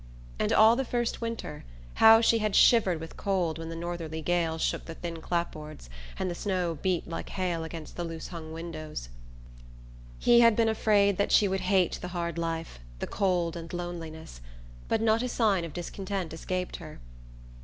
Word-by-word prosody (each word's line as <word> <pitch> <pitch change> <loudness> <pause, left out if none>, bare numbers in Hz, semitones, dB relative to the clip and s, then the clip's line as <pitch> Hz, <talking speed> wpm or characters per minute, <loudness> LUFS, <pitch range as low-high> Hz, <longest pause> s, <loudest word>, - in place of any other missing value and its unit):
And - - +1
all 220 +2 +7
the 270 - 0
first 240 -2 -2
winter, 230 -10 -5 0.4
how 225 0 +9
she 230 0 +4
had 215 -2 0
shivered 195 -8 +5
with 165 0 -9
cold 175 -5 -1
when 165 0 -6
the 165 - -5
northerly 165 -2 -5
gales 165 -2 0
shook - - -1
the 165 - -7
thin 165 -1 -6
clapboards 155 - -4 0.3
and 190 - -1
the 175 - -2
snow 175 -4 -2
beat 185 -2 0
like 165 - -5
hail 175 -3 -2
against 160 -1 -8
the 175 - -2
loose 165 -1 -6
hung 165 -3 -8
windows! 155 - -6 1.1
He 240 0 +5
had 230 -2 +6
been 225 0 +3
afraid 205 -3 +3
that 200 - 0
she 205 - +5
would 190 0 -1
hate 185 -1 +2
the - - -4
hard 170 -1 -2
life, 165 - -3 0.2
the - - -3
cold 180 -4 0
and 165 -1 -7
loneliness; 165 - -6 0.5
but 225 0 +1
not 225 0 +3
a 250 - -2
sign 210 -7 +2
of 165 - -5
discontent 185 +1 -4
escaped 180 +2 -3
her. 155 -4 -10
175 Hz, 180 wpm, -28 LUFS, 165-200 Hz, 1.1 s, how